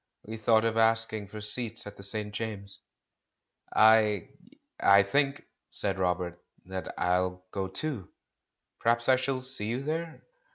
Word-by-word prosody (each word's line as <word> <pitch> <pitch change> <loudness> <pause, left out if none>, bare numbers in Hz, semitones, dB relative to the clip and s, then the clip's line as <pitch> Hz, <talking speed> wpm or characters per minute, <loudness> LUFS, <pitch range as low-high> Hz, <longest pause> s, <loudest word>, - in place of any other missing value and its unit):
We 110 +1 -7
thought 110 0 +3
of 115 0 0
asking 115 -2 +2
for 105 +2 -8
seats 115 +2 -1
at 105 0 -9
the - - -12
St. 105 +1 -3
James's." 105 -3 -5 0.9
"I 110 -3 +5 0.3
— - - -43
I 100 0 +6
think',' 140 +7 0 0.2
said 95 -2 -2
Robert, 90 -1 -1 0.2
"that 95 -1 -5
I'll 90 +1 0
go, 95 -1 -2
too. 110 - -4 0.7
Perhaps 120 +1 +1
I 130 - +6
shall 130 0 -2
see 130 -5 -1
you 120 +4 -2
there. 160 +2 -4
110 Hz, 150 wpm, -29 LUFS, 100-120 Hz, 0.9 s, I